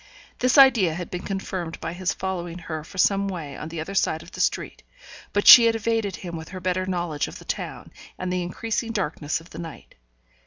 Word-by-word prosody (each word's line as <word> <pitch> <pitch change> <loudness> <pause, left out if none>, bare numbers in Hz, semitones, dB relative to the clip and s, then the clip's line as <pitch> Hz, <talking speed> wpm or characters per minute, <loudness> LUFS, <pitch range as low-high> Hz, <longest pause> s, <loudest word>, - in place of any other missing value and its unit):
This 255 +3 +3
idea 235 - +6
had 175 0 -6
been 180 - -4
confirmed 185 -4 -4
by 165 - -4
his 185 +1 -1
following 175 -2 -4
her 160 -3 -6
for 185 - -13
some 200 +1 +3
way 160 -7 -5
on 155 - -7
the 165 0 -6
other 160 +5 -5
side 160 -4 0
of 170 - -15
the - - -5
street; - - -1 0.5
but 205 - 0
she 235 - +11
had 225 - +2
evaded 225 -3 -1
him 170 -2 -7
with 160 0 -8
her 185 - -7
better 185 +1 -1
knowledge 175 -5 -2
of - - -9
the - - -14
town, - - -5 0.3
and 185 0 -3
the 180 - 0
increasing 225 +6 -3
darkness 155 -7 -2
of 165 - -17
the 160 - -9
night. 165 -3 -9
180 Hz, 220 wpm, -24 LUFS, 165-195 Hz, 0.5 s, she